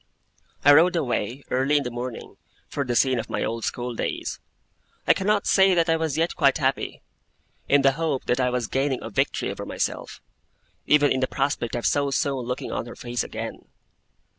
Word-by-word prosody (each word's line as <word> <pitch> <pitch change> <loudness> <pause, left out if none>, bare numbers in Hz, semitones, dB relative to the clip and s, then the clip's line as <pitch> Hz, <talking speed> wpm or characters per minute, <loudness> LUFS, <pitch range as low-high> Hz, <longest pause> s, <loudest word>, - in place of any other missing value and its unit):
I 145 - +9
rode 175 +5 +5
away, 135 -3 -2
early 135 +3 +2
in 145 - 0
the 125 - -4
morning, 120 0 -6 0.3
for 140 - -2
the 125 -3 -2
scene 130 0 +3
of 110 - -6
my - - -2
old 115 0 -3
school 125 0 -3
days. - - -3 0.7
I - - +6
cannot 205 +1 0
say 190 -1 +4
that 165 -1 +2
I - - +4
was 160 -3 -1
yet 165 +2 0
quite 140 -4 +3
happy, 135 -2 -1 0.7
in 140 -1 +4
the 135 - +6
hope 150 -2 -2
that 125 - +1
I 125 -1 +2
was 125 -1 -1
gaining 135 +2 -1
a 115 - -6
victory - - 0
over - - -6
myself; - - -4 0.7
even 145 -1 +4
in 130 - +1
the 130 - +1
prospect 135 -4 -1
of 120 - -3
so 140 -1 +2
soon 135 -2 -1
looking 125 +1 -4
on - - -3
her 120 - -9
face 120 -3 -3
again. - - -7
135 Hz, 195 wpm, -24 LUFS, 125-150 Hz, 0.7 s, I